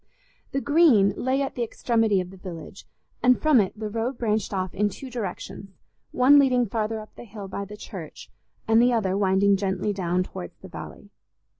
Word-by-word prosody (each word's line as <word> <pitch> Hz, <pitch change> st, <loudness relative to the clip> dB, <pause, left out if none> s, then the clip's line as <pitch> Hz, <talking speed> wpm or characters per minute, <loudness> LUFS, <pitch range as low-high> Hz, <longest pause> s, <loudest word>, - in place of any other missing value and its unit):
The 275 Hz, -, -1 dB
Green 285 Hz, -11 st, +4 dB
lay 265 Hz, +2 st, 0 dB
at 270 Hz, -, -4 dB
the 245 Hz, -, -5 dB
extremity 225 Hz, -3 st, +1 dB
of 180 Hz, 0 st, -4 dB
the 190 Hz, -, -13 dB
village, 180 Hz, 0 st, -9 dB, 0.3 s
and 250 Hz, +1 st, +4 dB
from 305 Hz, -7 st, +5 dB
it 200 Hz, +2 st, -4 dB
the 215 Hz, -, -3 dB
road 230 Hz, +4 st, -3 dB
branched 215 Hz, -3 st, -1 dB
off 185 Hz, -2 st, -2 dB
in 205 Hz, +1 st, +1 dB
two 255 Hz, +7 st, -9 dB
directions, 210 Hz, -3 st, -6 dB, 0.4 s
one 275 Hz, +3 st, +6 dB
leading 250 Hz, -3 st, +3 dB
farther 220 Hz, +1 st, -2 dB
up 215 Hz, -, -12 dB
the -, -, -10 dB
hill 205 Hz, -3 st, -9 dB
by 200 Hz, +1 st, -5 dB
the 210 Hz, +1 st, -10 dB
church, 185 Hz, -7 st, -9 dB, 0.4 s
and 225 Hz, +1 st, +5 dB
the 245 Hz, 0 st, +4 dB
other 195 Hz, -5 st, +1 dB
winding 195 Hz, 0 st, +3 dB
gently 190 Hz, +1 st, -1 dB
down 180 Hz, -1 st, 0 dB
towards 90 Hz, -, -9 dB
the -, -, -12 dB
valley. -, -, -10 dB
215 Hz, 190 wpm, -25 LUFS, 195-245 Hz, 0.4 s, one